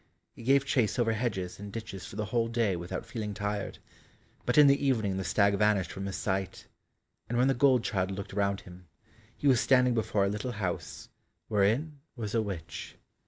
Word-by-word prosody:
He -, -, -11 dB
gave 135 Hz, +3 st, +3 dB
chase 125 Hz, -5 st, +1 dB
over 115 Hz, -2 st, +2 dB
hedges 105 Hz, -6 st, -2 dB
and 100 Hz, 0 st, -7 dB
ditches 100 Hz, -5 st, -7 dB
for -, -, -10 dB
the 105 Hz, -, -2 dB
whole 115 Hz, +2 st, 0 dB
day 115 Hz, -4 st, +1 dB
without 90 Hz, +2 st, -5 dB
feeling 105 Hz, -3 st, -5 dB
tired, 105 Hz, -1 st, -3 dB, 0.7 s
but 125 Hz, -, +1 dB
in 150 Hz, -, +9 dB
the 140 Hz, 0 st, +4 dB
evening 110 Hz, -8 st, +1 dB
the 95 Hz, -, -2 dB
stag 100 Hz, +1 st, +3 dB
vanished 100 Hz, -3 st, +2 dB
from 95 Hz, 0 st, -5 dB
his 95 Hz, -, -4 dB
sight, 95 Hz, -2 st, -2 dB, 0.6 s
and 120 Hz, -, -1 dB
when 125 Hz, +2 st, +4 dB
the 135 Hz, -, +4 dB
gold 130 Hz, -2 st, +4 dB
child 95 Hz, -7 st, 0 dB
looked 95 Hz, 0 st, -6 dB
round 100 Hz, 0 st, 0 dB
him, 90 Hz, 0 st, -14 dB, 0.5 s
he 145 Hz, -, -1 dB
was 130 Hz, -4 st, +5 dB
standing 125 Hz, -2 st, +4 dB
before 110 Hz, -3 st, +1 dB
a -, -, +1 dB
little 105 Hz, +5 st, -3 dB
house, 95 Hz, -5 st, -4 dB, 0.4 s
wherein 115 Hz, +9 st, +1 dB, 0.2 s
was 110 Hz, -4 st, -5 dB
a 115 Hz, -, +3 dB
witch. 95 Hz, -6 st, -6 dB
105 Hz, 195 wpm, -30 LUFS, 100-120 Hz, 0.7 s, in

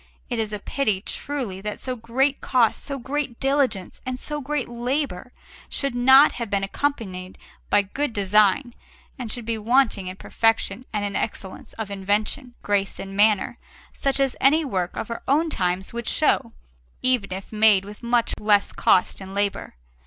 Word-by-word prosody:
It 240 Hz, -, -1 dB
is 215 Hz, -1 st, -1 dB
a 210 Hz, -, -2 dB
pity, 215 Hz, -2 st, -1 dB
truly, 235 Hz, -6 st, -4 dB
that 210 Hz, +1 st, -5 dB
so 255 Hz, -1 st, -3 dB
great 255 Hz, +5 st, 0 dB
cost, 245 Hz, -4 st, +2 dB
so 280 Hz, -1 st, -3 dB
great 270 Hz, -1 st, -3 dB
diligence, 270 Hz, -9 st, 0 dB
and 255 Hz, 0 st, -4 dB
so 295 Hz, +1 st, -4 dB
great 285 Hz, -1 st, -2 dB
labour 245 Hz, -3 st, -3 dB, 0.4 s
should 275 Hz, -2 st, -1 dB
not 265 Hz, +4 st, +7 dB
have 235 Hz, -3 st, -5 dB
been 200 Hz, -1 st, 0 dB
accompanied 195 Hz, -6 st, -3 dB, 0.3 s
by 205 Hz, -, +4 dB
good 275 Hz, +8 st, -3 dB
design 210 Hz, +4 st, +3 dB, 0.5 s
and 235 Hz, -4 st, -4 dB
should 240 Hz, -1 st, -4 dB
be 225 Hz, -1 st, -2 dB
wanting 225 Hz, -4 st, +2 dB
in 185 Hz, -, -5 dB
perfection 225 Hz, +4 st, 0 dB
and 210 Hz, -2 st, -1 dB
in 200 Hz, -, -4 dB
excellence 190 Hz, -1 st, -4 dB
of 220 Hz, -3 st, -6 dB
invention, 210 Hz, +6 st, -1 dB
grace, 200 Hz, -1 st, 0 dB
and 195 Hz, 0 st, -7 dB
manner, 210 Hz, 0 st, +3 dB, 0.3 s
such 275 Hz, 0 st, -1 dB
as 270 Hz, -2 st, +1 dB
any 305 Hz, +4 st, +4 dB
work 185 Hz, -8 st, -2 dB
of 225 Hz, -, -4 dB
our 230 Hz, -, -4 dB
own 310 Hz, +4 st, +2 dB
times 180 Hz, -1 st, -1 dB
would 235 Hz, -1 st, -5 dB
show, -, -, +2 dB, 0.5 s
even 250 Hz, -7 st, +2 dB
if 190 Hz, +3 st, -6 dB
made 210 Hz, -3 st, +5 dB
with 205 Hz, +1 st, -11 dB
much 235 Hz, -1 st, +1 dB
less 205 Hz, -1 st, +3 dB
cost 185 Hz, -, +2 dB
and 190 Hz, 0 st, -8 dB
labour. 200 Hz, -, -1 dB
225 Hz, 170 wpm, -24 LUFS, 200-265 Hz, 0.5 s, not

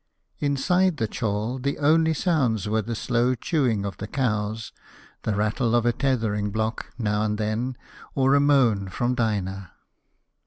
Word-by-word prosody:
Inside 160 Hz, +5 st, +2 dB
the 110 Hz, -, 0 dB
chall 110 Hz, +3 st, -2 dB
the 140 Hz, +2 st, -2 dB
only 160 Hz, +2 st, +3 dB
sounds 130 Hz, -, +1 dB
were 110 Hz, +1 st, +1 dB
the 115 Hz, +2 st, -4 dB
slow 120 Hz, +2 st, +1 dB
chewing 120 Hz, -, 0 dB
of 100 Hz, -, -5 dB
the 105 Hz, -, -6 dB
cows, 110 Hz, -3 st, -2 dB, 0.5 s
the 110 Hz, -, -1 dB
rattle 110 Hz, +3 st, +1 dB
of 120 Hz, -1 st, +2 dB
a 120 Hz, -, +3 dB
tethering 110 Hz, -7 st, 0 dB
block, 110 Hz, +2 st, -3 dB
now 105 Hz, -3 st, 0 dB
and 105 Hz, 0 st, 0 dB
then, 110 Hz, +4 st, -2 dB, 0.4 s
or 135 Hz, 0 st, +3 dB
a 140 Hz, -, +5 dB
moan 125 Hz, -9 st, +3 dB
from 120 Hz, +6 st, -1 dB
Dinah. 95 Hz, -6 st, -2 dB
115 Hz, 155 wpm, -25 LUFS, 105-135 Hz, 0.5 s, a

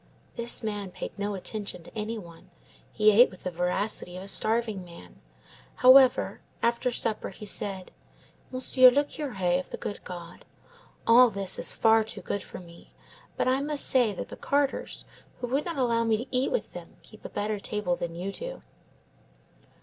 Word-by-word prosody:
"... -, -, -34 dB
This 235 Hz, 0 st, +4 dB
man 205 Hz, -3 st, -3 dB
paid -, -, -7 dB
no 205 Hz, 0 st, -3 dB
attention 200 Hz, -2 st, -5 dB
to -, -, -15 dB
any 220 Hz, +1 st, -3 dB
one. 170 Hz, -5 st, -13 dB, 0.4 s
He 215 Hz, 0 st, +4 dB
ate 235 Hz, +5 st, +6 dB
with 185 Hz, -, -16 dB
the 185 Hz, -, -3 dB
voracity 180 Hz, +1 st, -2 dB
of 185 Hz, -, -7 dB
a -, -, -10 dB
starving 215 Hz, +1 st, 0 dB
man. 170 Hz, -, -14 dB, 0.5 s
However, 255 Hz, 0 st, +5 dB, 0.2 s
after 235 Hz, +2 st, +1 dB
supper 225 Hz, -2 st, -1 dB
he 210 Hz, -, -11 dB
said: 195 Hz, -2 st, -1 dB, 0.6 s
"'Monsieur 255 Hz, 0 st, +6 dB
le 280 Hz, +4 st, +2 dB
Curé 195 Hz, -, -1 dB
of 185 Hz, -, -8 dB
the -, -, -6 dB
good 205 Hz, -, -6 dB
God, 175 Hz, -1 st, -9 dB, 0.6 s
all 245 Hz, +2 st, +7 dB
this 195 Hz, -3 st, 0 dB
is -, -, +2 dB
far 225 Hz, 0 st, +4 dB
too 215 Hz, -2 st, -6 dB
good 200 Hz, +2 st, -3 dB
for -, -, -10 dB
me; 170 Hz, -2 st, -16 dB, 0.4 s
but -, -, 0 dB
I 260 Hz, +2 st, +2 dB
must 290 Hz, 0 st, +1 dB
say 245 Hz, -5 st, +3 dB
that 195 Hz, -, -7 dB
the -, -, -9 dB
carters 280 Hz, -1 st, -1 dB, 0.3 s
who -, -, -3 dB
would 275 Hz, +4 st, 0 dB
not 340 Hz, -4 st, -4 dB
allow 235 Hz, -3 st, +1 dB
me 225 Hz, -1 st, +2 dB
to 245 Hz, +3 st, -6 dB
eat 255 Hz, +2 st, +1 dB
with -, -, -2 dB
them -, -, -10 dB
keep -, -, -15 dB
a -, -, -7 dB
better 210 Hz, 0 st, -3 dB
table 200 Hz, -3 st, -2 dB
than 170 Hz, -1 st, -5 dB
you 185 Hz, +3 st, -4 dB
do. -, -, -8 dB
215 Hz, 185 wpm, -27 LUFS, 185-250 Hz, 0.6 s, all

